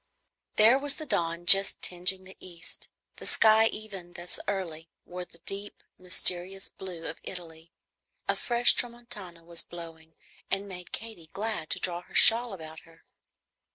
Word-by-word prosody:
There 225 +5 +6
was 285 0 0
the 310 - -7
dawn 170 - -1
just 195 +2 +8
tingeing 185 +1 +3
the 190 +1 -14
east. 175 -1 -9 0.3
The - - -6
sky, 220 0 +5
even 195 -6 -8
thus 175 +1 -3
early, 170 -5 -4 0.2
wore 180 0 -7
the 170 - -16
deep 200 +1 -8 0.2
mysterious 185 +1 +1
blue 175 -3 -9
of 165 - -6
Italy. 165 -2 -10 0.6
A - - +2
fresh 240 0 +4
tramontana 210 -8 -6
was 170 0 -6
blowing, 165 -2 -11 0.3
and 195 +1 -1
made 180 -2 -9
Katy 220 -8 -8
glad 210 -6 -3
to - - 0
draw 175 -1 -3
her - - -17
shawl 235 +1 +6
about 160 -4 -9
her. 165 -1 -21
180 Hz, 155 wpm, -28 LUFS, 170-210 Hz, 0.6 s, just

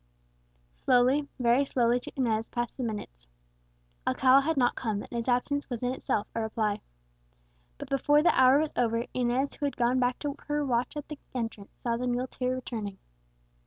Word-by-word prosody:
Slowly, 255 +4 +3
very 245 +2 +4
slowly 245 -3 +2
to - - -9
Inez 225 -4 0
passed 240 -1 -3
the - - -6
minutes. 205 - -5 0.8
Alcala 265 +1 +5
had 320 +2 -1
not 245 -2 +3
come, 215 -4 -3
and - - -13
his 235 0 -3
absence 260 +4 0
was 245 -1 -4
in 250 - +1
itself 210 -5 -1
a 230 - -1
reply. 220 -2 -1 1.0
But - - -8
before 290 +2 +3
the - - +5
hour 260 +1 +6
was 305 0 0
over, 230 0 +1
Inez, 255 +2 0
who 290 - -3
had 280 - -5
gone 245 +1 +2
back 250 0 +1
to 285 -2 -2
her 295 0 0
watch 250 +3 0
at 295 - -5
the 300 -2 -8 0.2
entrance, 225 -4 -5
saw 235 -1 -1
the 250 +1 -2
muleteer 250 +1 -1
returning. 220 -6 -5
250 Hz, 180 wpm, -29 LUFS, 235-270 Hz, 1.0 s, hour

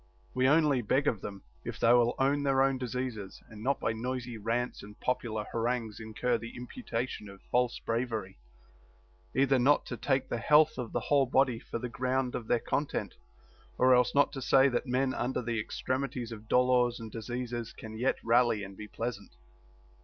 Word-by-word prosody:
We 130 +1 +2
only 150 -4 +4
beg 130 +6 +1
of 105 - +1
them, 100 -1 -7 0.2
if - - -6
they 115 - +5
will 120 -1 +4
own 140 +2 +2
their 135 -1 +3
own 135 -1 +1
diseases 125 -5 -4
and 110 -1 -11
not 135 +5 0
by 115 - 0
noisy 125 +1 -4
rants 115 +3 -2
and 105 +1 -12
popular 115 -4 -2
harangues 115 -2 -2
incur 115 +2 -1
the 115 +1 -8
imputation 125 - -4
of 100 0 -12
false 125 -1 +2
bravery, 115 -5 -3 1.0
either 135 0 +4
not 140 +4 +4
to 125 - -5
take 130 +3 0
the 120 - -2
health 150 +5 +4
of 120 -3 -4
the - - -1
whole 140 -2 +3
body 130 -2 +2
for - - -5
the 125 - -4
ground 130 +1 -1
of 115 - -4
their 120 - +3
content, 140 +5 -2 0.6
or 130 0 +5
else 125 +1 +3
not 145 - +4
to 135 -2 -6
say 135 +1 +5
that 120 +2 -1
men 130 +1 +1
under 125 +1 -1
the 115 -1 -1
extremities 130 +1 -3
of 110 -1 -9
dolors 125 -1 +3
and 110 -1 -8
diseases 120 0 -4
can 110 0 -9
yet 125 +4 +1
rally 115 -2 +3
and 95 0 -8
be 105 - -8
pleasant. 115 -1 -5
125 Hz, 185 wpm, -30 LUFS, 115-130 Hz, 1.0 s, they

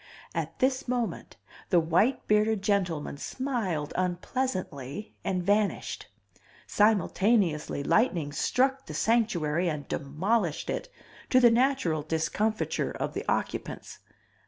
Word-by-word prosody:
At - - -3
this 260 +1 +1
moment 245 -2 -3 0.3
the 180 - +5
white 175 +11 +1
bearded 210 -1 +2
gentleman 180 -8 0
smiled 205 - -3
unpleasently 185 - -3
and 180 -2 -1
vanished. 205 +2 0 0.6
Simultaneously 200 -7 +2
lightning 170 - +2
struck 265 - +1
the - - -6
Sanctuary 180 -8 +1
and 150 -3 -4
demolished 170 +5 -1
it, - - -4 0.4
to 255 - +5
the 240 -2 +7
natural 240 - +2
discomfiture 165 +8 -1
of - - -3
the - - -3
occupants. - - -3
200 Hz, 110 wpm, -28 LUFS, 160-235 Hz, 0.6 s, the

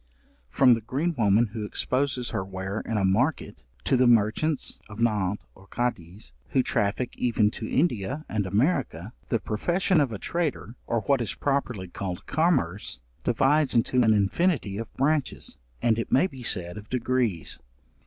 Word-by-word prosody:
From 130 -2 +5
the 115 - 0
green 145 +10 -1
woman 110 -1 +3
who 110 -2 -4
exposes 130 +3 -1
her - - -1
ware 95 +2 -4
in 115 - -3
a 100 - +2
market, 125 +11 0 0.2
to - - +2
the 125 0 +4
merchants 120 +7 +2
of 105 - -10
Nantz 105 -4 0
or 95 - -18
Cadiz, 95 - -4 0.2
who 130 - +2
traffic 110 +5 -1
even 110 -3 +2
to 110 - -6
India 135 - 0
and 105 -3 -1
America, 110 - 0 0.2
the 115 - +2
profession 175 - +1
of 135 -5 0
a 110 - -4
trader, 155 - -3
or 115 -1 0
what 130 +5 +1
is 115 - -2
properly 125 -9 -1
called 90 0 -5
commerce, 130 - 0 0.2
divides 135 +4 +2
into 125 +2 +3
an 110 -2 +4
infinity 105 - +1
of 115 - -6
branches, 145 +1 -1 0.3
and 115 -1 +3
it 115 - -4
may 135 - +5
be 135 -8 -7
said 90 -6 -1
of 105 +1 -10
degrees. 120 - 0
115 Hz, 165 wpm, -26 LUFS, 100-135 Hz, 0.3 s, From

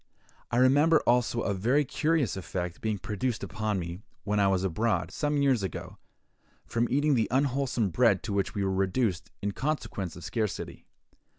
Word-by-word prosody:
I 120 - 0
remember 145 +5 +5
also 120 -1 +2
a 100 - 0
very 125 +10 +2
curious 150 - +1
effect 90 -2 -4
being 110 -2 -1
produced 110 +4 -3
upon 110 -2 -2
me, 85 0 -5 0.2
when 105 0 0
I 100 - +4
was 95 -1 +1
abroad, 105 +5 0
some 145 -1 0
years 130 -5 +3
ago, 95 - -6 0.7
from 115 +1 0
eating 145 +2 +2
the 115 -5 +2
unwholesome 130 -4 +1
bread 110 -4 +3
to 105 - -3
which 100 -1 -1
we 100 - 0
were 95 0 0
reduced, 95 0 0
in 100 - 0
consequence 110 - -3
of 90 - -10
a - - -7
scarcity. 110 -4 -3
110 Hz, 175 wpm, -28 LUFS, 95-130 Hz, 0.7 s, remember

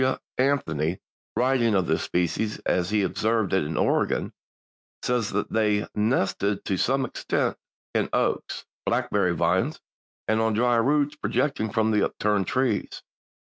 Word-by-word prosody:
W. 130 - +1 0.2
Anthony, 90 - +1 0.4
writing 125 -3 +2
of 95 -2 +2
this 80 - 0
species 90 +5 -1
as 90 0 +1
he 105 -1 +2
observed 110 +1 0
it 95 - +3
in 75 +1 -4
Oregon, - - +1 0.7
says 120 -4 0
that 105 +1 -2
"they 105 -2 +2
nested 105 -2 0
to 95 - 0
some 135 +7 +1
extent - - -1 0.4
in - - +1
oaks, - - -1 0.2
blackberry 90 -4 +1
vines - - +1 0.5
and 110 0 +2
on 110 0 +1
dry 120 +2 +3
roots 145 +5 +2
projecting 135 -7 -1
from 110 +1 +1
upturned 105 -3 0
trees. 125 -5 -1
110 Hz, 135 wpm, -25 LUFS, 95-125 Hz, 0.7 s, it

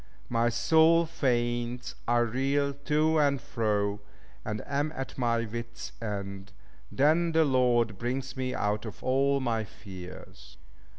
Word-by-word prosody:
My 115 0 +2
soul 160 +7 +4
faints, 120 -5 -1
I 120 +1 +3
reel 135 +4 +1
to 150 +3 +1
and 140 -2 +3
fro, 105 -3 -1 0.4
and 105 0 -4
am 145 +2 -1
at 135 - -5
my 115 -2 +1
wit's 115 +1 -6
end: 100 -2 -5 0.4
then 160 +4 +3
the 160 0 +4
Lord 120 -6 +2
brings 130 +2 -3
me 130 -1 -2
out 105 +1 0
of 110 - -8
all 140 +2 +2
my 115 -4 0
fears." 90 - -11
120 Hz, 130 wpm, -29 LUFS, 110-140 Hz, 0.4 s, soul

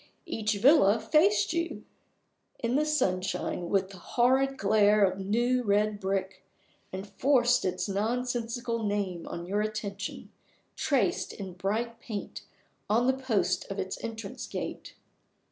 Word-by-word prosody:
Each 215 -1 -1
villa 230 -3 +5
faced 330 - +3
you 335 0 -2 0.7
in 235 +2 -1
the 305 +2 +2
sunshine 185 - -1
with 195 -1 +1
the 190 - -11
horrid 265 +6 +2
glare 210 0 +4
of 190 0 -1
new 240 +6 +1
red 210 -1 +1
brick, 190 -1 -2 0.5
and 190 +1 -5
forced 245 +3 +3
its 185 +2 -1
nonsensical 235 +2 -2
name 200 -5 -2
on 170 - -5
your 200 +3 0
attention, 210 -1 -4 0.4
traced 275 -9 0
in 190 -4 -7
bright 220 +6 -2
paint 215 -5 -6 0.5
on 230 +4 +3
the 260 - +4
posts 260 -6 0
of 195 - -5
its 190 0 -4
entrance 225 -3 -6
gate. - - -6
215 Hz, 130 wpm, -29 LUFS, 195-245 Hz, 0.7 s, villa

